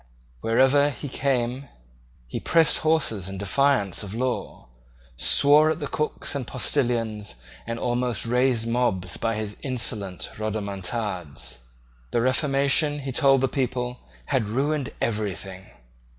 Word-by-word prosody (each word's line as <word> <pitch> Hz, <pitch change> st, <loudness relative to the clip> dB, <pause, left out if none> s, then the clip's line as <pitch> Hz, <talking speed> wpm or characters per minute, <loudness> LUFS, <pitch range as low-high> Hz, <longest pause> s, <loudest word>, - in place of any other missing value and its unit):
Wherever 135 Hz, -, +4 dB
he 145 Hz, +1 st, -6 dB
came 130 Hz, -1 st, -1 dB, 0.6 s
he -, -, -5 dB
pressed 165 Hz, -2 st, +4 dB
horses 115 Hz, -, +1 dB
in 95 Hz, -, -6 dB
defiance 100 Hz, -1 st, +1 dB
of 100 Hz, 0 st, -6 dB
law, 125 Hz, -, -3 dB, 0.5 s
swore 145 Hz, -, +6 dB
at 155 Hz, -, -1 dB
the 145 Hz, -, -3 dB
cooks 150 Hz, +1 st, -2 dB
and 135 Hz, -4 st, -3 dB
postilions, 115 Hz, -, 0 dB, 0.3 s
and 115 Hz, 0 st, -3 dB
almost 120 Hz, -2 st, -1 dB
raised 125 Hz, -1 st, +2 dB
mobs 115 Hz, -7 st, 0 dB
by 115 Hz, -1 st, -1 dB
his 105 Hz, -1 st, -5 dB
insolent 110 Hz, -, -3 dB
rodomontades. 100 Hz, -, -4 dB, 0.5 s
The 120 Hz, -, 0 dB
Reformation, 140 Hz, +3 st, +2 dB
he 135 Hz, -1 st, -4 dB
told 135 Hz, 0 st, +4 dB
the 135 Hz, -, +3 dB
people, 125 Hz, -1 st, -2 dB, 0.3 s
had 130 Hz, -7 st, 0 dB
ruined 140 Hz, +3 st, -1 dB
everything. 95 Hz, -3 st, -3 dB
120 Hz, 120 wpm, -25 LUFS, 105-135 Hz, 0.6 s, swore